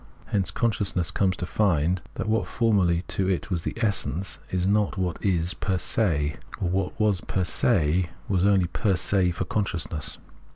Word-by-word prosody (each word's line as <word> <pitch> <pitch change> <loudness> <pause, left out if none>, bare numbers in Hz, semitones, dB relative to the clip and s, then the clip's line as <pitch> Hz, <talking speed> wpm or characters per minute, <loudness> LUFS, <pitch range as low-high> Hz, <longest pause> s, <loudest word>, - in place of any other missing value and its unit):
Hence 100 -3 0
consciousness 105 -7 0
comes 95 -2 +1
to 90 - -2
find 90 -3 +1
that - - -3
what 110 +1 +1
formerly 95 -7 +2
to 95 -1 0
it 95 +2 -1
was 85 -2 -1
the - - -3
essence 100 - -1
is 90 -1 0
not 100 0 +1
what 90 0 -2
is 90 -3 +1
fer 95 -1 +1
se, 80 -7 0 0.2
or 90 - 0
what 95 0 -2
was 105 -4 +2
fer 95 - 0
se 90 -4 +2 0.2
was 95 -3 +1
only 100 -2 +4
fer 100 -4 +2
se 95 0 +2
for 85 - -2
consciousness. 85 -7 -1
95 Hz, 170 wpm, -26 LUFS, 85-100 Hz, 0.2 s, only